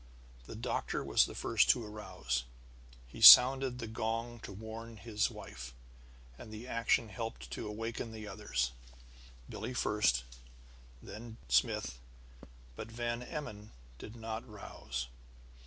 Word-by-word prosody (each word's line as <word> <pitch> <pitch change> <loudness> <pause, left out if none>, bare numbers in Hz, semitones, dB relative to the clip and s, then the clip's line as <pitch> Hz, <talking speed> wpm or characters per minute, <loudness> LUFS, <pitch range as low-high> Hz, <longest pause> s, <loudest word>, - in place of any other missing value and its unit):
The - - -8
doctor - - -2
was - - +3
the - - -9
first - - +2
to 120 - +4
arouse. 90 - -4 0.6
He 60 - -11
sounded 130 0 +10
the 120 - -5
gong 115 +1 -3
to 105 - -9
warn 110 +3 -8
his 105 -1 -1
wife, 60 -1 -9 0.6
and 110 - -10
the 110 +3 -8
action 115 -1 +1
helped 95 - -6
to - - -5
awaken 115 +2 -5
the 110 -1 -8
others; 95 - -2 0.8
Billie 125 - -6
first, 105 - +2 0.8
then 115 +1 -9
Smith. - - +1 0.8
But 110 - -8
Van 120 +1 -3
Emmon 110 -6 -7 0.3
did 110 - -9
not 115 0 -5
rouse. 65 - -6
110 Hz, 125 wpm, -33 LUFS, 100-115 Hz, 0.8 s, sounded